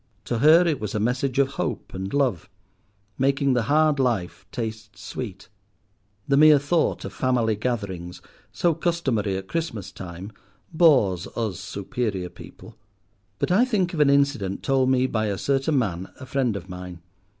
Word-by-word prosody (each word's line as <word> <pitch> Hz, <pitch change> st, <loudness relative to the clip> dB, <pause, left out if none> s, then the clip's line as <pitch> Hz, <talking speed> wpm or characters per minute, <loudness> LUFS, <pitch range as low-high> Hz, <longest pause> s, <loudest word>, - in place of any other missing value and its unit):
To 120 Hz, -, -2 dB
her 160 Hz, +6 st, +6 dB
it 155 Hz, -5 st, 0 dB
was 105 Hz, -1 st, -4 dB
a -, -, +1 dB
message 125 Hz, +4 st, -1 dB
of 140 Hz, -1 st, +4 dB
hope -, -, -3 dB
and 95 Hz, +1 st, -5 dB
love, 130 Hz, -, 0 dB, 0.7 s
making 135 Hz, 0 st, +2 dB
the 120 Hz, -, +2 dB
hard 155 Hz, -1 st, +3 dB
life 115 Hz, -9 st, -1 dB
taste 110 Hz, -2 st, -6 dB
sweet. 100 Hz, -7 st, -7 dB, 0.8 s
The 140 Hz, -, +3 dB
mere 155 Hz, 0 st, +8 dB
thought 145 Hz, +4 st, 0 dB
of -, -, -7 dB
family 120 Hz, -4 st, +1 dB
gatherings, 100 Hz, -7 st, -4 dB, 0.3 s
so 170 Hz, -1 st, +1 dB
customary 135 Hz, -, -1 dB
at 95 Hz, 0 st, -7 dB
Christmas 115 Hz, -, -4 dB
time, 90 Hz, +2 st, -8 dB, 0.4 s
bores 130 Hz, -, +4 dB
us 110 Hz, -6 st, -2 dB
superior 100 Hz, -1 st, -3 dB
people; 110 Hz, -, -13 dB, 0.6 s
but -, -, -1 dB
I 205 Hz, +7 st, +5 dB
think 200 Hz, -9 st, 0 dB
of 165 Hz, -, -3 dB
an 150 Hz, -2 st, +5 dB
incident 140 Hz, -9 st, +1 dB
told 135 Hz, -2 st, +2 dB
me 130 Hz, -1 st, +3 dB
by 110 Hz, -4 st, -1 dB
a 100 Hz, -2 st, -2 dB
certain 140 Hz, -, +1 dB
man, 95 Hz, -7 st, -2 dB
a 130 Hz, -, -8 dB
friend 130 Hz, -5 st, 0 dB
of 95 Hz, -2 st, -6 dB
mine. 90 Hz, -2 st, -9 dB
125 Hz, 160 wpm, -24 LUFS, 100-140 Hz, 0.8 s, mere